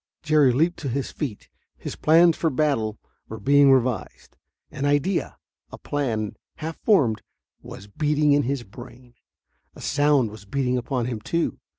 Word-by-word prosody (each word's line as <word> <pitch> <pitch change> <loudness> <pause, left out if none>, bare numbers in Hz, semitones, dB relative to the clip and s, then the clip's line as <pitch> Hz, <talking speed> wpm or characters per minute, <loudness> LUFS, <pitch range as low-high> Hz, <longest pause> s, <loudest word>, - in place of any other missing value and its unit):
Jerry 150 -4 +4
leaped 165 +8 +1
to 140 - -4
his 135 +2 -3
feet. 125 -9 -6 0.3
His - - -7
plans 165 +1 +4
for 165 - 0
battle 125 -7 0 0.3
were 110 - -7
being 140 0 +5
revised. 130 -2 -1 0.4
An 140 - -6
idea 145 +6 0 0.3
a - - -9
plan, 115 -8 -3 0.2
half 160 +1 -6
formed 130 - +2 0.4
was 100 - -11
beating 150 +7 +1
in 145 0 +4
his 135 -2 -2
brain. 120 +2 -13 0.6
A - - -12
sound 145 -5 +2
was 105 -2 -12
beating 125 +3 -1
upon 125 0 -2
him, 115 -3 -4
too. 170 +7 -2
135 Hz, 155 wpm, -24 LUFS, 120-150 Hz, 0.6 s, being